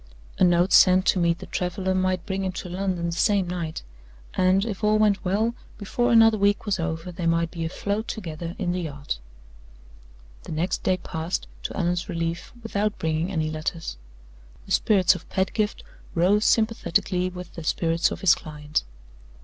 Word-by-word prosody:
A - - +5
note 175 +1 +4
sent 185 0 +6
to 190 - +3
meet 170 -1 +2
the - - -9
traveler 185 +1 -2
might 185 -1 0
bring 195 0 -2
him 190 - -1
to 180 - -6
London 180 -1 -2
the 170 - -1
same 195 +2 +2
night; 170 -3 -4 0.5
and, 185 +2 +3
if 215 -3 -5
all 210 0 +4
went 210 -2 +2
well, 210 +5 +1 0.2
before 240 +4 0
another 225 -2 +6
week 200 +2 +2
was 205 -3 0
over 165 +1 -3
they 170 -1 -3
might 165 0 +1
be 165 -2 -4
afloat 200 +6 -2
together 170 -4 -5
in 180 -3 -1
the 180 0 -1
yacht. 145 - -4 1.3
The - - -6
next 170 +4 -1
day 185 - +1
passed, 165 0 -3 0.2
to - - -5
Allan's 175 0 -1
relief, 165 -1 -3
without 210 -1 -1
bringing 160 +3 -1
any 155 -4 -1
letters. 155 - -4 0.7
The - - -11
spirits 190 -3 +4
of - - -10
Pedgift 210 +3 -1 0.3
rose 195 +5 +3
sympathetically 190 -4 +1
with 180 -1 -9
the 170 - -7
spirits 165 +1 +1
of - - -6
his 190 - +6
client. 150 -1 -3
180 Hz, 175 wpm, -25 LUFS, 165-200 Hz, 1.3 s, sent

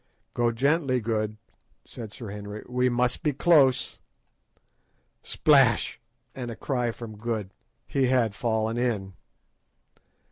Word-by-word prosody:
"Go 120 -1 +2
gently, 135 +2 +1
Good," 110 -1 -2 0.5
said 110 -3 -9
Sir 110 -2 -8
Henry, 105 +1 -7
"we 125 0 +1
must 125 0 +1
be 150 - +1
close." 135 -4 +3 1.2
Splash! - - +3 0.3
and 125 -2 -5
a 115 - -5
cry 125 -1 -1
from 115 -1 -7
Good. 110 -3 -4 0.3
He 135 -2 +1
had 125 -4 +2
fallen 110 0 -1
in. 105 -6 -1
120 Hz, 115 wpm, -26 LUFS, 110-125 Hz, 1.2 s, close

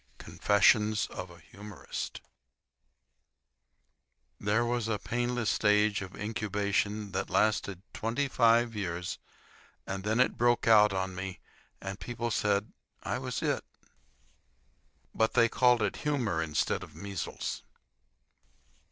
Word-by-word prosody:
CONFESSIONS 105 +1 +3
OF 90 0 -6
A 85 -1 -14
HUMORIST 105 0 -7 2.2
There 110 +4 +1
was 120 -1 -1
a 110 -2 0
painless 120 +1 -1
stage 105 0 +3
of 95 -1 -8
incubation 105 -1 -1
that - - -2
lasted 100 -3 +1
twenty 120 +6 -1
five 115 -2 +3
years, 90 -3 -3 0.7
and 95 0 -4
then 110 +3 0
it 130 - +2
broke 120 -1 +3
out 105 -2 +7
on 95 -1 -2
me, 95 0 -6 0.4
and 95 +1 -6
people 120 -1 -4
said 105 0 0 0.3
I - - -2
was - - -4
It. - - 0 1.5
But 110 0 +1
they 115 -1 +6
called 125 -1 +3
it 100 - -1
humor 125 - 0
instead 75 -2 0
of - - -11
measles. 100 -3 -5
105 Hz, 115 wpm, -30 LUFS, 100-115 Hz, 2.2 s, out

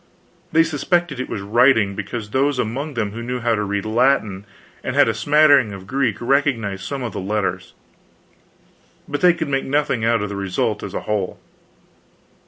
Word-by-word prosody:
They 165 +1 +5
suspected 165 -1 -1
it 130 - -4
was 100 - -4
writing, 110 -1 +3
because 105 +1 -5
those 135 +2 +1
among 135 +6 -3
them 105 -3 -1
who 115 +3 -7
knew 125 +1 -3
how 120 -1 +1
to 105 - 0
read 100 0 -2
Latin 110 -4 +1 0.4
and - - -3
had - - +5
a - - +1
smattering 145 -7 +4
of 95 -1 -9
Greek, 130 -1 -1
recognized 120 -7 0
some 140 -2 -4
of 115 -5 -4
the - - -4
letters, 105 +1 -3 1.3
but 145 - -3
they 180 -1 +5
could 160 -3 -3
make 135 -1 0
nothing 140 -4 0
out 115 -2 +2
of 105 - -3
the 100 - -5
result 100 -2 -1
as - - -7
a - - -2
whole. 105 -3 -3
120 Hz, 185 wpm, -20 LUFS, 105-140 Hz, 1.3 s, They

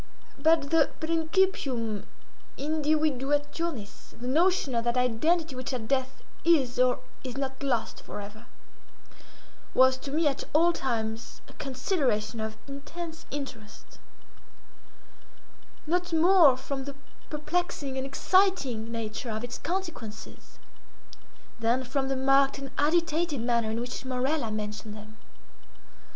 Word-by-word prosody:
But 310 -1 +3
the 325 -3 +5
principium 315 - 0 0.5
indivduationis, 295 -3 -1
the 245 - -6
notion 325 0 +3
of 230 -1 +1
that 240 +1 +1
identity 290 +6 +2
which 255 +1 -4
at 230 -4 -3
death 260 0 -1 0.2
is 270 -8 +3
or 255 0 +3 0.2
is 255 -1 -5
not 265 -1 -3
lost 250 -5 -1
forever—was 220 +4 -3
to 275 - -6
me, 310 +2 +2
at 275 -1 0
all 335 +3 +5
times, 225 -5 -3
a - - -14
consideration 255 - -1
of 220 0 -4
intense 320 +4 -7
interest; 265 -7 -8 1.9
not 355 +3 0
more 330 -4 +6
from 270 0 -4
the 280 -1 -6 0.3
perplexing 300 -2 -2
and 265 - -1
exciting 275 - +2
nature 230 +1 -4
of 220 +1 -3
its 245 0 -5
consequences, 330 - -5 1.0
than 235 +3 +2
from 265 +2 -1
the 270 - 0
marked 270 +1 +4
and 275 0 -7
agitated 325 -1 +1
manner 235 -1 +1
in 220 +1 -1
which 245 +3 -4
Morella 260 0 0
mentioned 210 0 -4
them. 215 +1 -12
270 Hz, 115 wpm, -28 LUFS, 235-315 Hz, 1.9 s, more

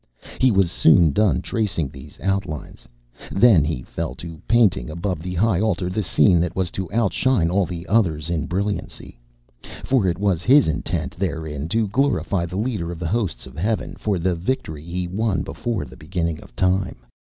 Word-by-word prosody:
He 130 - +5
was 95 -6 +2
soon 80 -2 +5
done 95 -4 +2
tracing 100 -10 -1
these 70 +2 -13
outlines; 95 -5 -3 0.4
then 100 -7 +5
he 75 -5 -2
fell 65 - -5
to 85 +3 -9
painting 105 - +3
above 85 +1 -3
the 90 +1 -5
high 100 0 +2
altar 95 -4 0
the 105 - -1
scene 85 -1 +4
that 90 +1 -1
was 95 -3 -1
to 95 -2 -5
outshine 110 -3 +2
all 95 -1 +2
the 85 -1 -6
others 85 -8 +1
in 80 -3 -1
brilliancy. 100 -9 -4 0.6
For 125 -8 +2
it 85 - 0
was 95 -4 +1
his 135 +8 +5
intent 80 - -2
therein 80 -5 -3
to 110 +3 +1
glorify 105 -7 0
the 90 +2 -5
leader 105 -7 -2
of 85 - -6
the 85 0 -3
hosts 110 -2 -1
of 65 0 -13
Heaven 105 +8 -1
for 105 -3 -1
the 90 +2 0
victory 85 - -3
he 90 +2 -3
won 100 +2 -1
before 115 -5 -3
the - - -13
beginning 85 -1 -3
of - - -16
time. 90 -8 0
90 Hz, 180 wpm, -22 LUFS, 80-105 Hz, 0.6 s, He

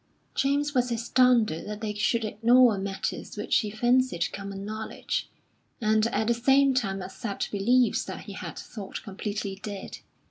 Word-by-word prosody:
James 285 +2 +1
was 250 -2 +1
astounded 235 -5 +2
that 210 0 -5
they 215 -2 -2
should 220 +2 +1
ignore 235 +2 +5
matters 195 0 -4
which - - +2
he 215 - -2
fancied 240 -4 +1
common 195 0 -6
knowledge, 215 +1 -4 0.5
and 215 0 +3
at 220 -1 0
the 235 - +3
same 270 +3 +4
time 195 -7 -1
accept 195 +2 -4
beliefs 240 +5 +3
that - - -6
he - - -9
had - - -7
thought 205 -5 -7
completely 200 -1 -4
dead. 200 -2 -6
220 Hz, 150 wpm, -27 LUFS, 200-245 Hz, 0.5 s, ignore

